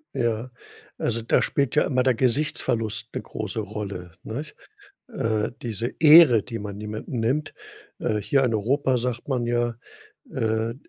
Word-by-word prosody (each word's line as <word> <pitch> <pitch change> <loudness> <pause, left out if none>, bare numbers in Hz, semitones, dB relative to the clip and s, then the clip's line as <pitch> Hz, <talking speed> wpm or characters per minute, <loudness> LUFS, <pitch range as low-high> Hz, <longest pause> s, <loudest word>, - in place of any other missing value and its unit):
Ja, 115 +1 -1 0.5
also 115 - -1
da 115 - +2
spielt 140 -2 +1
ja 150 - +5
immer 130 -2 +1
der 130 0 +3
Gesichtsverlust 115 -3 0
'ne - - -3
große 110 0 -4
Rolle, 100 -4 -6
nicht? 145 +8 -6 0.6
Äh, 110 - -1
diese 115 0 -2
Ehre, 150 - +8
die 115 -2 -6
man 100 0 -7
jemanden 110 +3 -5
nimmt. 130 +7 -1 0.4
Äh, 110 - -1
hier 135 +6 +2
in 125 -3 +1
Europa 130 +5 +1
sagt 120 -1 -3
man 125 -4 -1
ja, 120 -1 0 0.6
äh, 110 +1 -1
115 Hz, 150 wpm, -24 LUFS, 110-130 Hz, 0.6 s, Ehre